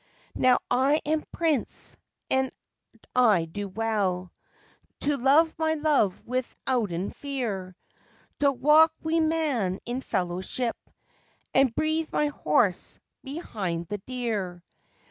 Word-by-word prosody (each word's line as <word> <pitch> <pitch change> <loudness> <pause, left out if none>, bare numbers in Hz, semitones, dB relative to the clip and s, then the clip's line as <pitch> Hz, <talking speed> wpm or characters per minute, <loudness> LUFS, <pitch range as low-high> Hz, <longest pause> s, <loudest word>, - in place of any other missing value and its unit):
"Now 255 -1 +4
I 275 +4 +3
am 305 +1 +1
prince, 315 -7 -1 0.4
and 265 0 +2 0.6
I 215 -9 +5
do 200 +5 -5
well 195 -4 -1 0.7
To 290 0 +2
love 285 +5 +4
my 315 0 +2
love 295 -11 +1
withouten 235 -6 -2
fear; 220 -10 -4 0.6
To 285 -1 +4
walk 300 +5 +5
wi' 320 +1 +1
man 295 - +1
in 245 +2 -3
fellowship, 185 +6 -2 0.8
And 265 -3 +4
breathe 315 +1 0
my 295 - +1
horse 290 - +1 0.2
behind 200 - -4
the 205 - -3
deer. 205 -7 -3
250 Hz, 105 wpm, -27 LUFS, 200-295 Hz, 0.8 s, I